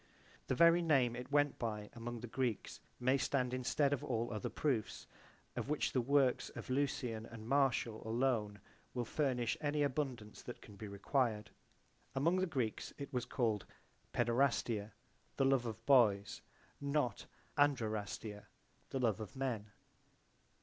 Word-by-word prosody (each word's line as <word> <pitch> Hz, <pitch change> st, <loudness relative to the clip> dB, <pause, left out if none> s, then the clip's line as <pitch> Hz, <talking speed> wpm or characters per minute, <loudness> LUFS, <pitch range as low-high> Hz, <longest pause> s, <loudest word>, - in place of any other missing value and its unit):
The -, -, +1 dB
very 170 Hz, +4 st, +6 dB
name 135 Hz, -8 st, +3 dB
it 125 Hz, +2 st, -7 dB
went 145 Hz, 0 st, +3 dB
by 105 Hz, -3 st, -3 dB
among 120 Hz, 0 st, -5 dB
the 120 Hz, -, -5 dB
Greeks 120 Hz, -3 st, -2 dB, 0.2 s
may 130 Hz, +2 st, +3 dB
stand 125 Hz, -2 st, 0 dB
instead 135 Hz, +3 st, +2 dB
of 140 Hz, -, -2 dB
all 115 Hz, -1 st, -1 dB
other 105 Hz, -, -2 dB
proofs, 130 Hz, -8 st, -1 dB, 0.5 s
of -, -, -3 dB
which 150 Hz, -, +1 dB
the 130 Hz, -, +2 dB
works 135 Hz, 0 st, +3 dB
of -, -, -6 dB
Lucian 130 Hz, -5 st, -1 dB
and 115 Hz, -1 st, -9 dB
Martial 130 Hz, -4 st, +2 dB
alone 110 Hz, -3 st, 0 dB, 0.4 s
will 120 Hz, -1 st, -1 dB
furnish 125 Hz, -4 st, 0 dB
any 150 Hz, 0 st, +1 dB
abundance 130 Hz, -6 st, -2 dB
that 120 Hz, -, -8 dB
can 105 Hz, -, -13 dB
be 105 Hz, +2 st, -7 dB
required. 105 Hz, +1 st, 0 dB, 0.6 s
Among 165 Hz, +7 st, +3 dB
the 185 Hz, 0 st, +1 dB
Greeks 125 Hz, -9 st, -2 dB
it 140 Hz, 0 st, -7 dB
was 125 Hz, -1 st, 0 dB
called 115 Hz, -5 st, 0 dB, 0.4 s
Paederastia, 120 Hz, -3 st, +1 dB, 0.4 s
the 135 Hz, -, +3 dB
love 135 Hz, -3 st, +3 dB
of 110 Hz, -3 st, -6 dB
boys, 105 Hz, -7 st, +4 dB, 0.4 s
not 140 Hz, -5 st, 0 dB, 0.3 s
Andrerastia, 110 Hz, -6 st, 0 dB, 0.4 s
the 135 Hz, -, -2 dB
love 115 Hz, -5 st, +2 dB
of 110 Hz, +5 st, -7 dB
men. 120 Hz, -6 st, -2 dB
125 Hz, 145 wpm, -36 LUFS, 110-140 Hz, 0.6 s, very